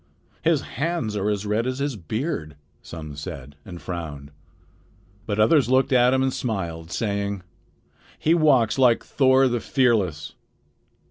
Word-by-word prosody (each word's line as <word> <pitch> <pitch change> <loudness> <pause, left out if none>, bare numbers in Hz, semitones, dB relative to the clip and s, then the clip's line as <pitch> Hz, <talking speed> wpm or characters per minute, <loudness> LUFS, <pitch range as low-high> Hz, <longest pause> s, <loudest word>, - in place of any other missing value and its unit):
"His - - +2
hands 140 -6 -3
are 105 0 0
as 105 0 -2
red 110 +4 0
as 130 0 -2
his 140 -2 -2
beard," 95 - -4 0.3
some 75 -3 -8
said, 70 -1 -8
and 90 -2 -9
frowned. 75 -6 -6 1.0
But 105 -1 -2
others 125 +3 +4
looked 130 +1 +3
at 125 0 +5
him 130 0 +2
and 130 -1 0
smiled, 85 -8 -4
saying: 100 -3 -2 0.7
"He 160 - +2
walks 135 -8 +3
like 125 -3 +4
Thor 130 -1 +4
the 120 -1 0
Fearless." 110 - 0
110 Hz, 140 wpm, -24 LUFS, 85-130 Hz, 1.0 s, at